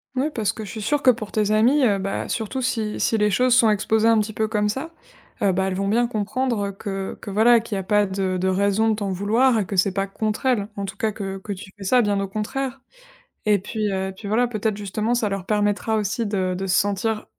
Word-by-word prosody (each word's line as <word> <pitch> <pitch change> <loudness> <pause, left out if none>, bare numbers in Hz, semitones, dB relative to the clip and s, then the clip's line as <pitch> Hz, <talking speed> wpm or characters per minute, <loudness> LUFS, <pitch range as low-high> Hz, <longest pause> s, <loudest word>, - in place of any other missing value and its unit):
Mouais, 280 +4 0
parce 220 -6 -1
que 220 - -7
je - - -8
suis 220 - -6
sûre 280 +7 0
que 255 - +7
pour 215 -3 -6
tes 210 -1 +1
amies, 245 +7 +4
heu, 200 -3 +2
bah, 195 +1 -3
surtout 245 +3 -2
si 220 -3 -1
si 225 - +1
les 210 0 +3
choses 250 +5 +3
sont 235 -3 +5
exposées 215 +2 +2
un 225 -1 +5
petit 215 0 -2
peu 220 0 0
comme 210 -1 0
ça, 265 +10 -3 0.5
heu, 195 - +4
bah, 190 +1 0
elles 185 - -2
vont 195 +1 -1
bien 235 +3 +2
comprendre, 220 0 -1
heu, - - -4
que 195 -1 -5
que, - - -7
voilà, 225 +4 +5
qu'il 225 -1 -5
y - - -1
a 190 - -4
pas 210 +1 +2
de 190 -1 -1
de 185 +1 0
raison 200 +3 +2
de 220 - +2
t'en 200 -2 -3
vouloir 220 +6 +2
et 200 - -1
que 200 - -4
c'est 190 +1 +3
pas 195 0 -1
contre 215 +5 -2
elles. 210 -6 +1
En 200 - -2
tout 195 - -8
cas, 220 -1 0
que 195 -2 -5
que 200 +2 -6
tu 190 0 -10
fais 200 - -9
ça, 250 +6 +4
bien 205 -3 +1
au 195 - -2
contraire 255 +6 -4 0.6
et 210 -1 +4
puis 210 +1 -3
heu, 190 0 -1
et - - -5
puis 200 +2 -9
voilà, 240 +3 +2
peut-être 215 -2 -2
justement, 210 +3 -1
ça 235 -3 +1
leur 195 -2 -3
permettra 210 +1 0
aussi 220 +3 -1
de 190 -3 -1
de 195 - -3
se 185 - +2
sentir 210 +2 0
210 Hz, 265 wpm, -23 LUFS, 195-225 Hz, 0.6 s, que